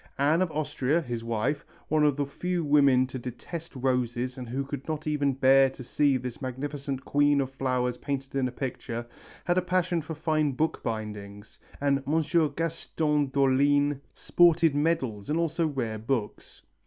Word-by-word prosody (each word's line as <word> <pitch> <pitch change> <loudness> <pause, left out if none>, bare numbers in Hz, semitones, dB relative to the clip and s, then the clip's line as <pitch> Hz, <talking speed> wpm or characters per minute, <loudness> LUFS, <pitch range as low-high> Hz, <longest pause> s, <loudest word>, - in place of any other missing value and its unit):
Anne 150 +5 +3
of 185 - +1
Austria, 150 0 0
his 120 -7 -4
wife, 115 +6 -1 0.2
one 155 0 +2
of 145 -2 +3
the 145 0 -1
few 175 +5 -2
women 140 -3 +5
to 130 0 -6
detest 145 +7 -7
roses 125 -1 -1
and 125 -2 -7
who 135 +3 -2
could 140 -1 -6
not 155 -1 -3
even 145 -2 +1
bear 135 0 +5
to 130 - -10
see 140 +2 +2
this 125 +2 -7
magnificent 135 +1 -4
Queen 145 0 +3
of 135 -1 -1
Flowers 125 -2 -1
painted 135 -1 -4
in 135 -2 +1
a - - -5
picture, 120 -2 -5 0.4
had 175 +1 +3
a - - 0
passion 180 -1 0
for 160 +1 -6
fine 155 -2 0
book 155 +5 -1
bindings, 105 -2 -6 0.2
and 140 -1 +1
Monsieur 160 +1 +2
Gaston 155 -1 -1
d'Orléans 140 +1 +2 0.2
sported 170 -3 +4
medals 140 -9 -1
and 155 - +1
also 165 0 +1
rare 120 -7 -3
books. 115 -1 -4
140 Hz, 165 wpm, -27 LUFS, 125-155 Hz, 0.4 s, women